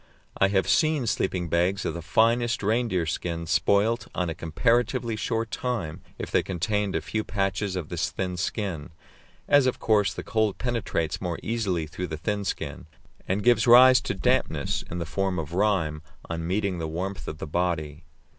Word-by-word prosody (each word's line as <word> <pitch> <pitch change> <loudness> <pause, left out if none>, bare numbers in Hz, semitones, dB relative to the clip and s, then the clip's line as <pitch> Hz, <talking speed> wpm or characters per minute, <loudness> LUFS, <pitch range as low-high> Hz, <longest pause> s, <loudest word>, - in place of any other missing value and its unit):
I 95 - +4
have 95 -1 +1
seen 155 -5 +2
sleeping 90 -5 -1
bags 90 +4 +1
of - - -1
the 85 - -5
finest 115 +5 +2
reindeer 110 -5 +1
skin 85 +1 -3
spoilt 105 +7 +2
in 90 -2 0
a - - -2
comparatively 115 - 0
short 115 +1 -2
time 115 -12 -3 0.2
if - - -6
they - - +3
contained 100 +2 -1
a - - 0
few 110 0 -2
patches 95 -1 -1
of 85 -5 -4
this 85 -2 -1
thin 90 +1 -3
skin, 90 -5 -3 0.6
as 145 -2 +5
of 130 - 0
course 105 -3 +2
the - - -5
cold 110 -3 0
penetrates 115 -10 -2
more 90 -3 -2
easily 100 -8 -1
through 90 +4 -5
the 80 - -5
thin 100 +5 -2
skin, 80 - -4 0.4
and 100 +2 0
gives 120 -2 +4
rise 130 +2 +8
to - - -3
dampness - - 0
in 90 - -4
the 85 - -3
form 95 +2 -1
of 80 0 -4
rime 85 -6 +1 0.3
on 85 0 -4
meeting 95 -1 -1
the 80 - -2
warmth 95 +5 -4
of 75 - -5
the - - -5
body. 80 -2 -2
95 Hz, 180 wpm, -26 LUFS, 85-110 Hz, 0.6 s, rise